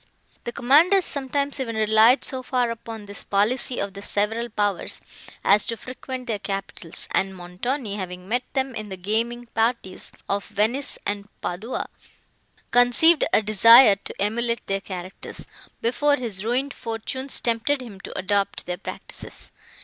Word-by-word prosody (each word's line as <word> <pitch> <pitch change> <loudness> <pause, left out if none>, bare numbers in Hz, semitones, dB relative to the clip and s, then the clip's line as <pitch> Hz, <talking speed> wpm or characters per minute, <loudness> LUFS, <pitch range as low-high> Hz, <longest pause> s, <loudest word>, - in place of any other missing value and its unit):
The 240 - -2
commanders 330 +11 +4
sometimes 280 0 -2
even 230 -4 -3
relied 220 +4 +5
so 260 -1 -2
far 250 -2 0
upon 225 -2 -7
this 200 0 -5
policy 235 +5 0
of 200 -1 -3
the 200 - -8
several 220 +4 0
powers, 205 -3 -1 0.4
as 210 - +5
to 230 - -2
frequent 255 +1 -7
their 220 -4 -2
capitals; 195 -4 -3
and 190 0 0
Montoni, 205 +6 -3
having 180 -1 -6
met 245 +4 +1
them 265 -1 -1
in 215 -2 -6
the 190 - -6
gaming 230 +5 -1
parties 225 -4 -1 0.2
of 200 0 -1
Venice 220 +7 0
and 205 0 -3
Padua, 200 +8 -4 0.8
conceived 245 +7 +5
a 215 - +4
desire 215 +2 +8
to - - -10
emulate 235 +3 0
their 195 0 -1
characters, 185 -1 -7 0.4
before 285 +5 +3
his 220 -8 -4
ruined 255 +5 0
fortunes 235 +4 -2
tempted 235 +5 +1
him 210 -6 -10
to - - -8
adopt 200 +1 0
their 180 0 -3
practices. - - -8
225 Hz, 150 wpm, -24 LUFS, 200-250 Hz, 0.8 s, desire